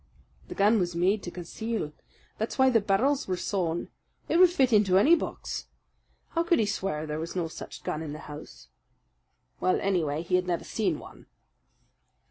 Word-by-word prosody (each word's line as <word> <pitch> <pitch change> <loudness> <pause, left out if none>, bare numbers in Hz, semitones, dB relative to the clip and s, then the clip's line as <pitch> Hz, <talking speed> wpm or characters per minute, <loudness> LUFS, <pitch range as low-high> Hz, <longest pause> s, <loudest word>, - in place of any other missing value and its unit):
"The - - -7
gun 210 +3 +4
was 175 -2 -1
made 190 +5 +2
to 175 - -6
conceal. 180 0 -4 0.5
That's 220 - -2
why 265 -1 +5
the 225 -3 +4
barrels 250 +9 +1
were 185 -1 -1
sawed. 175 -3 -1 0.4
It 335 - +3
would 365 -1 +8
fit 265 -9 +2
into 200 -3 +5
any 285 - +6
box. 340 - -2 0.6
How 335 - 0
could 340 0 +3
he 220 - +2
swear 190 -6 -2
there 150 0 -3
was 165 +3 -5
no 175 -3 0
such 160 - -9
gun 155 - -3
in 155 -2 -5
the 150 - -6
house?" 150 +1 -10 0.9
"Well, 185 - +2
anyhow, 165 -6 0
he 180 +1 +2
had 180 0 -2
never 175 -2 -1
seen 190 -8 -1
one." - - -13
190 Hz, 180 wpm, -28 LUFS, 170-225 Hz, 0.9 s, would